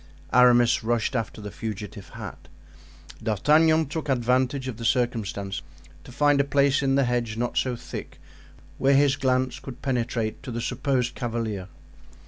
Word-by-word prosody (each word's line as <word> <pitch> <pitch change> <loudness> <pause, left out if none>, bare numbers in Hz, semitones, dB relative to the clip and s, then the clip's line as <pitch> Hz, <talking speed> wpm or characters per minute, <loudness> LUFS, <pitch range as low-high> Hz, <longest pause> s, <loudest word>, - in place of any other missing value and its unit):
Aramis 120 -1 +5
rushed 115 +2 0
after 110 -2 -3
the 105 -1 -7
fugitive 105 -3 -6
hat. - - -9 0.7
D'Artagnan 155 - +3
took 150 +1 -5
advantage 130 +1 +1
of 125 -4 -5
the 115 - -7
circumstance 105 -7 -1 0.4
to - - -12
find 145 +1 +3
a - - +1
place 140 0 +2
in 135 -1 +2
the 140 - +4
hedge 120 -3 -1
not 120 +1 -2
so 125 -2 +1
thick, - - -8 0.6
where 135 +1 +4
his 140 -1 +4
glance 130 -2 0
could 130 -3 -10
penetrate 120 -4 -1
to - - -8
the 120 -1 -3
supposed 125 0 -1
cavalier. 115 -5 -3
125 Hz, 150 wpm, -25 LUFS, 115-135 Hz, 0.7 s, Aramis